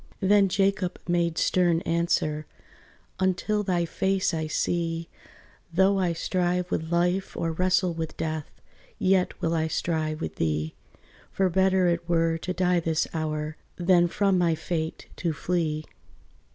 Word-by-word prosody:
Then 200 Hz, 0 st, +4 dB
Jacob 195 Hz, -1 st, +1 dB
made 170 Hz, -1 st, +1 dB
stern 175 Hz, -2 st, +2 dB
answer, 165 Hz, -3 st, 0 dB, 0.7 s
"Until 190 Hz, +3 st, +1 dB
thy 180 Hz, -4 st, 0 dB
face 190 Hz, +2 st, 0 dB
I 160 Hz, -1 st, -1 dB
see, 165 Hz, +1 st, -1 dB, 0.6 s
Though 190 Hz, +3 st, +3 dB
I 180 Hz, -2 st, +1 dB
strive 180 Hz, +1 st, -1 dB
with 160 Hz, +1 st, -2 dB
life 175 Hz, +2 st, 0 dB
or 165 Hz, -, -1 dB
wrestle 180 Hz, +1 st, +2 dB
with 165 Hz, -1 st, -5 dB
death, 155 Hz, -2 st, -3 dB, 0.5 s
Yet 185 Hz, -1 st, +1 dB
will 165 Hz, -2 st, 0 dB
I 160 Hz, -1 st, +1 dB
strive 155 Hz, -1 st, -1 dB
with -, -, -5 dB
thee: 80 Hz, -1 st, -1 dB, 0.6 s
For 190 Hz, -1 st, +1 dB
better 190 Hz, 0 st, +3 dB
it 170 Hz, 0 st, -1 dB
were 165 Hz, -1 st, +2 dB
to 180 Hz, -, -4 dB
die 180 Hz, -1 st, +2 dB
this 160 Hz, -1 st, 0 dB
hour 155 Hz, -1 st, -3 dB, 0.2 s
Than 175 Hz, -1 st, +4 dB
from 195 Hz, +1 st, +2 dB
my 170 Hz, -2 st, +2 dB
fate 160 Hz, 0 st, -3 dB
to 170 Hz, -3 st, -1 dB
flee. 155 Hz, -1 st, -1 dB
175 Hz, 140 wpm, -26 LUFS, 160-185 Hz, 0.7 s, Then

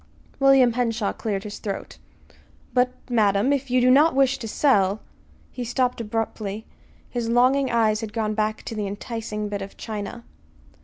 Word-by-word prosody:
William 270 Hz, -3 st, +5 dB
Henshaw 230 Hz, -3 st, -1 dB
cleared 200 Hz, -3 st, -3 dB
his 205 Hz, -1 st, -7 dB
throat. 200 Hz, -2 st, -6 dB, 0.7 s
"But, 250 Hz, 0 st, +3 dB, 0.2 s
madam, 215 Hz, +1 st, +2 dB
if 275 Hz, -1 st, -2 dB
you 250 Hz, +1 st, +3 dB
do 250 Hz, +1 st, +5 dB
not 295 Hz, +3 st, +5 dB
wish 270 Hz, 0 st, +3 dB
to 230 Hz, -, -5 dB
sell 210 Hz, -5 st, +2 dB, 0.2 s
" -, -, -31 dB
He 250 Hz, -, -5 dB
stopped 250 Hz, 0 st, 0 dB
abruptly. 220 Hz, -1 st, -3 dB, 0.5 s
His 235 Hz, -2 st, -2 dB
longing 255 Hz, +3 st, +3 dB
eyes 220 Hz, -2 st, +2 dB
had 220 Hz, -2 st, -5 dB
gone 215 Hz, -1 st, -1 dB
back 215 Hz, 0 st, -1 dB
to -, -, -6 dB
the 210 Hz, -2 st, -3 dB
enticing 210 Hz, +1 st, -4 dB
bit 205 Hz, -1 st, -4 dB
of 195 Hz, 0 st, -8 dB
china. 220 Hz, +2 st, -6 dB
225 Hz, 165 wpm, -24 LUFS, 210-250 Hz, 0.7 s, William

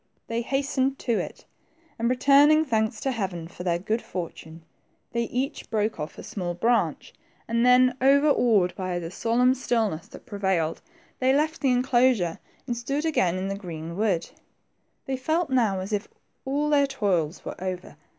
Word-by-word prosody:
They 230 Hz, +1 st, -2 dB
has 270 Hz, +3 st, -1 dB
tened 270 Hz, 0 st, 0 dB
to 235 Hz, -3 st, 0 dB
it, -, -, -6 dB, 0.5 s
and, 235 Hz, +1 st, +1 dB
returning 285 Hz, +5 st, +5 dB
thanks 220 Hz, -4 st, 0 dB
to 270 Hz, -, 0 dB
Heaven 190 Hz, -8 st, -3 dB
for 180 Hz, -, -11 dB
their 175 Hz, -2 st, +1 dB
good 215 Hz, +6 st, -2 dB
fortune, 165 Hz, -2 st, -7 dB, 0.5 s
they 235 Hz, 0 st, 0 dB
each 255 Hz, +4 st, -3 dB
broke 220 Hz, 0 st, -1 dB
off 150 Hz, 0 st, -6 dB
a -, -, -8 dB
small 175 Hz, -3 st, -4 dB
branch, 230 Hz, +6 st, 0 dB, 0.3 s
and 230 Hz, +1 st, +1 dB
then, 250 Hz, 0 st, +5 dB
overawed 260 Hz, -9 st, +4 dB
by 185 Hz, -1 st, -3 dB
the 170 Hz, -1 st, -5 dB
solemn 240 Hz, +5 st, +2 dB
stillness 225 Hz, -10 st, -1 dB
that -, -, -13 dB
prevailed, 190 Hz, -7 st, -1 dB, 0.4 s
they 260 Hz, +1 st, +3 dB
left 310 Hz, +2 st, 0 dB
the 270 Hz, -, +2 dB
enclosure 245 Hz, -7 st, +2 dB, 0.3 s
and 245 Hz, -2 st, -2 dB
stood 275 Hz, +6 st, -2 dB
again 185 Hz, -, +2 dB
in 185 Hz, +1 st, -2 dB
the 195 Hz, -, -2 dB
green 170 Hz, -4 st, -7 dB
wood. 195 Hz, -5 st, 0 dB, 0.8 s
They 265 Hz, -1 st, -2 dB
felt 315 Hz, +3 st, 0 dB
now 220 Hz, -7 st, +2 dB
as 195 Hz, +3 st, -5 dB
if 205 Hz, +1 st, -1 dB, 0.4 s
all 290 Hz, +3 st, 0 dB
their 285 Hz, -1 st, +4 dB
toils 190 Hz, -, -1 dB
were -, -, -6 dB
over? 185 Hz, -4 st, -5 dB
230 Hz, 170 wpm, -26 LUFS, 185-265 Hz, 0.8 s, returning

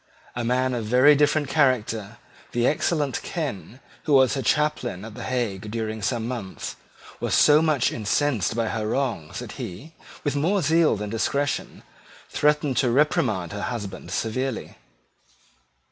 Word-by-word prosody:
A 120 Hz, -, -2 dB
man 130 Hz, +2 st, +1 dB
of 120 Hz, -2 st, -2 dB
a -, -, -6 dB
very 130 Hz, +5 st, +7 dB
different 150 Hz, 0 st, +2 dB
character, 120 Hz, -7 st, +1 dB, 0.4 s
the 120 Hz, 0 st, +1 dB
excellent 150 Hz, -1 st, 0 dB
Ken, 135 Hz, -, -5 dB, 0.3 s
who 150 Hz, -, +1 dB
was 130 Hz, -2 st, +5 dB
her 135 Hz, -, -1 dB
chaplain 130 Hz, -10 st, 0 dB
at 110 Hz, -, -9 dB
the -, -, -9 dB
Hague 110 Hz, -6 st, -2 dB
during 110 Hz, 0 st, -3 dB
some 115 Hz, +1 st, -1 dB
months, 115 Hz, -7 st, -5 dB, 0.4 s
was -, -, 0 dB
so 150 Hz, +1 st, +6 dB
much 155 Hz, -6 st, +2 dB
incensed 115 Hz, 0 st, 0 dB
by 115 Hz, -1 st, 0 dB
her 110 Hz, -1 st, -2 dB
wrongs 115 Hz, -, -2 dB
that -, -, -6 dB
he, 105 Hz, -, -8 dB, 0.3 s
with 145 Hz, -1 st, -1 dB
more 175 Hz, +6 st, +1 dB
zeal 160 Hz, -2 st, +4 dB
than 105 Hz, 0 st, -5 dB
discretion, 140 Hz, +5 st, -1 dB, 0.5 s
threatened 150 Hz, -3 st, +1 dB
to 125 Hz, -, +3 dB
reprimand 115 Hz, -, +1 dB
her 105 Hz, -, -5 dB
husband 105 Hz, -4 st, -5 dB
severely. 130 Hz, +2 st, -3 dB
125 Hz, 150 wpm, -24 LUFS, 110-145 Hz, 0.5 s, very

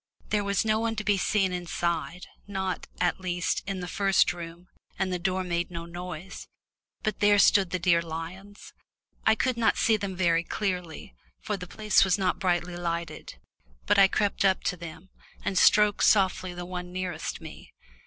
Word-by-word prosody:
There 210 Hz, -1 st, +1 dB
was 200 Hz, +2 st, 0 dB
no 215 Hz, 0 st, +2 dB
one 225 Hz, 0 st, -1 dB
to 215 Hz, -, -3 dB
be 205 Hz, 0 st, +2 dB
seen 195 Hz, -1 st, +1 dB
inside, 175 Hz, 0 st, -3 dB, 0.2 s
not, 190 Hz, -2 st, -3 dB
at 180 Hz, +2 st, +1 dB
least, 180 Hz, -2 st, -1 dB
in 195 Hz, -2 st, -3 dB
the 180 Hz, -, -5 dB
first 195 Hz, 0 st, +2 dB
room, 170 Hz, +1 st, -9 dB, 0.3 s
and 185 Hz, -1 st, -1 dB
the 180 Hz, -, -2 dB
door 185 Hz, +1 st, -1 dB
made 175 Hz, -1 st, -2 dB
no 170 Hz, -1 st, -6 dB
noise. 180 Hz, +1 st, -8 dB, 0.6 s
But 215 Hz, -1 st, -2 dB
there 205 Hz, 0 st, +5 dB
stood 200 Hz, -2 st, +5 dB
the 185 Hz, -, -1 dB
dear 170 Hz, -1 st, +3 dB
lions 170 Hz, +5 st, -8 dB, 0.5 s
I 220 Hz, -, +6 dB
could 250 Hz, +2 st, 0 dB
not 230 Hz, -1 st, +2 dB
see 225 Hz, -1 st, +3 dB
them 200 Hz, -2 st, -4 dB
very 170 Hz, -2 st, +2 dB
clearly, 180 Hz, -, -4 dB, 0.3 s
for 210 Hz, -, -3 dB
the 180 Hz, -2 st, -8 dB
place 215 Hz, +2 st, +3 dB
was 195 Hz, -1 st, +2 dB
not 185 Hz, -2 st, 0 dB
brightly 175 Hz, -2 st, 0 dB
lighted, 170 Hz, -1 st, -4 dB, 0.5 s
but -, -, +3 dB
I 195 Hz, -, +8 dB
crept 205 Hz, +1 st, 0 dB
up 190 Hz, -1 st, +2 dB
to -, -, 0 dB
them, 170 Hz, +2 st, -10 dB, 0.3 s
and 195 Hz, -, -1 dB
stroked 210 Hz, +2 st, +5 dB
softly 185 Hz, -3 st, +3 dB
the 175 Hz, 0 st, -6 dB
one 180 Hz, 0 st, -6 dB
nearest 185 Hz, 0 st, -4 dB
me. -, -, -11 dB
185 Hz, 180 wpm, -27 LUFS, 175-200 Hz, 0.6 s, I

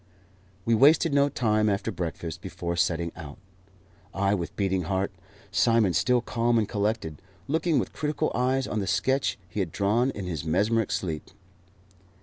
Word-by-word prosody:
We 115 Hz, -, +2 dB
wasted 145 Hz, +6 st, +5 dB
no 140 Hz, 0 st, +4 dB
time 110 Hz, -4 st, +1 dB
after 100 Hz, +3 st, -1 dB
breakfast 85 Hz, -2 st, -5 dB
before 85 Hz, -2 st, -4 dB
setting 85 Hz, -1 st, 0 dB
out 75 Hz, -3 st, -9 dB, 0.8 s
I 100 Hz, +1 st, +2 dB
with 85 Hz, -4 st, -3 dB
beating 95 Hz, -3 st, 0 dB
heart, 95 Hz, +2 st, -1 dB, 0.4 s
Simon 115 Hz, -6 st, +3 dB
still 125 Hz, +8 st, +2 dB
calm 120 Hz, 0 st, +1 dB
and 110 Hz, -2 st, +1 dB
collected, 105 Hz, -7 st, -2 dB, 0.3 s
looking 160 Hz, +2 st, +1 dB
with -, -, -1 dB
critical 150 Hz, -1 st, -1 dB
eyes 130 Hz, +2 st, +1 dB
on 110 Hz, -, -2 dB
the 100 Hz, -, -3 dB
sketch 135 Hz, +7 st, +1 dB
he 85 Hz, +4 st, -5 dB
had 90 Hz, -5 st, -1 dB
drawn 105 Hz, -, +1 dB
in 100 Hz, -7 st, -5 dB
his 80 Hz, -6 st, -4 dB
mesmeric 105 Hz, +7 st, +1 dB
sleep. 80 Hz, -5 st, -3 dB
105 Hz, 155 wpm, -27 LUFS, 90-120 Hz, 0.8 s, wasted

